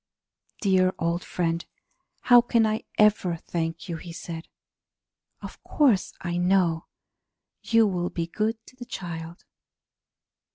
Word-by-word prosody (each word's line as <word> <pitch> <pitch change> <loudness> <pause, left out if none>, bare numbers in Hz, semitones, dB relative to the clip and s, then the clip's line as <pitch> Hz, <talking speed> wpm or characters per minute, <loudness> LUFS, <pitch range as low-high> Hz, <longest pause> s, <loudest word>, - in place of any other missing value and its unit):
"Dear 185 -2 +3
old 170 0 -1
friend, 170 -1 -1 0.6
how 245 -1 +7
can 235 -1 +2
I 215 0 -1
ever 210 -5 +3
thank 165 +1 -4
you?" 170 -2 -4
he 170 +1 -9
said. 165 -1 -7 1.0
"Of - - -9
course 255 -11 +2
I 175 0 -2
know 175 -2 +2 0.7
you 230 -1 +4
will 180 -3 -1
be 170 - -3
good 215 +6 -1
to - - -17
the 250 -1 -9
child! 170 -4 -7
180 Hz, 125 wpm, -26 LUFS, 170-215 Hz, 1.0 s, how